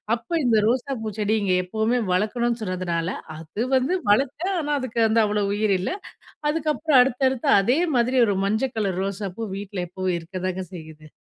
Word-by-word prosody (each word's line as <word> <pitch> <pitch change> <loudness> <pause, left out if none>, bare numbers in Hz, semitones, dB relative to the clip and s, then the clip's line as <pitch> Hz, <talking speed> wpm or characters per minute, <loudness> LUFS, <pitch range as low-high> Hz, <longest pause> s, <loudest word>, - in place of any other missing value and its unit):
அப்ப 235 0 -14 0.2
இந்த 235 -2 +3
ரோசாப்பூ 250 -2 -1
செடிய 215 +1 +1
இங்க 185 -2 +1
எப்பவுமே 220 +6 0
வளக்கணும்னு 230 +4 0
சொன்னதுனால, 175 -3 -2 0.3
அது 165 +8 -4
வந்து 260 +8 +2 0.2
வளர்த்தேன், 285 - +1
ஆனா, 295 -1 -3
அதுக்கு 235 -2 -2
வந்து 220 +1 +3
அவ்வளோ 210 0 0
உயிர் 210 0 +1
இல்ல. 185 - -2 0.6
அதுக்கப்புறம் 305 -2 +2
அடுத்தடுத்து, 260 0 +1
அதே 245 +9 +2 0.2
மாதிரி 250 +2 +2
ஒரு 200 - +1
மஞ்சக் 225 +5 0
கலர் 195 -4 -1
ரோசாப்பூ 200 +2 -4
வீட்ல 195 -2 -5
எப்பவும் 185 0 -2
இருக்கத்தாங்க 185 +2 -4
செய்யுது. 155 -2 -11
220 Hz, 155 wpm, -24 LUFS, 185-250 Hz, 0.6 s, இந்த